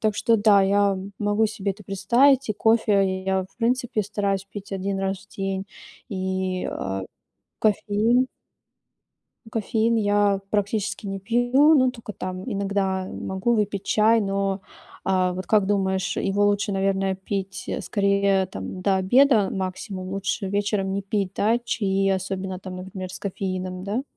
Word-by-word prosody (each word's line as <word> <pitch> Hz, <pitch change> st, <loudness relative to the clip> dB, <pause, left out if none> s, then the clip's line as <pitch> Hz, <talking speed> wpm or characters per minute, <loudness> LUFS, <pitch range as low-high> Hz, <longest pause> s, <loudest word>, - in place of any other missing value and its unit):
так 215 Hz, -1 st, +1 dB
что 230 Hz, +1 st, +3 dB
да, 205 Hz, -1 st, +5 dB
я 200 Hz, +1 st, +3 dB
м 195 Hz, +1 st, -6 dB
могу 205 Hz, +1 st, +2 dB
себе 210 Hz, -2 st, -3 dB
это 205 Hz, +2 st, -15 dB
представить, 235 Hz, +8 st, +3 dB
и -, -, +2 dB
кофе 200 Hz, -4 st, +2 dB
я 190 Hz, -1 st, 0 dB
в 190 Hz, -, -21 dB
принципе 245 Hz, -1 st, 0 dB
стараюсь 200 Hz, -1 st, -1 dB
пить 200 Hz, 0 st, -9 dB
1 195 Hz, 0 st, -2 dB
раз 195 Hz, 0 st, -1 dB
в 195 Hz, -, -19 dB
день 195 Hz, -1 st, -2 dB, 0.5 s
и, 190 Hz, -1 st, -2 dB
э, 95 Hz, 0 st, -3 dB, 0.6 s
кофеин 220 Hz, +4 st, +2 dB, 1.2 s
Ну 220 Hz, -, -13 dB
кофеин 225 Hz, +1 st, +1 dB
я 205 Hz, -2 st, +2 dB
практически 205 Hz, 0 st, -1 dB
не 195 Hz, 0 st, -4 dB
пью, 245 Hz, +8 st, +4 dB
но 260 Hz, -4 st, +5 dB
только 230 Hz, -4 st, -8 dB
там 185 Hz, -1 st, -5 dB
иногда 195 Hz, -3 st, -1 dB
могу 190 Hz, +5 st, -1 dB
выпить 205 Hz, -2 st, -1 dB
чай, 220 Hz, +1 st, +4 dB
но, 195 Hz, -1 st, -1 dB, 0.4 s
э, 185 Hz, -1 st, +2 dB
вот 185 Hz, 0 st, -6 dB
как 210 Hz, -3 st, +4 dB
думаешь, 190 Hz, -1 st, 0 dB
его 200 Hz, +1 st, +1 dB
лучше, 205 Hz, 0 st, +1 dB
наверное, 195 Hz, 0 st, 0 dB
пить, 195 Hz, 0 st, -4 dB
э, -, -, -3 dB
скорее 200 Hz, -1 st, +2 dB
там 140 Hz, -, -7 dB
до 195 Hz, -1 st, +3 dB
обеда 215 Hz, +1 st, +4 dB
максимум, 185 Hz, 0 st, -4 dB
лучше 195 Hz, 0 st, -2 dB
вечером 200 Hz, -1 st, 0 dB
не 200 Hz, -, -1 dB
пить, 200 Hz, -1 st, -2 dB
да 225 Hz, +3 st, +2 dB
чаи, 195 Hz, -5 st, 0 dB
особенно 190 Hz, -1 st, -2 dB
там, 185 Hz, -1 st, -8 dB
например, 185 Hz, 0 st, -7 dB
с -, -, -7 dB
кофеином, 185 Hz, -2 st, -4 dB
да? 210 Hz, +7 st, -2 dB
195 Hz, 155 wpm, -24 LUFS, 190-215 Hz, 1.2 s, да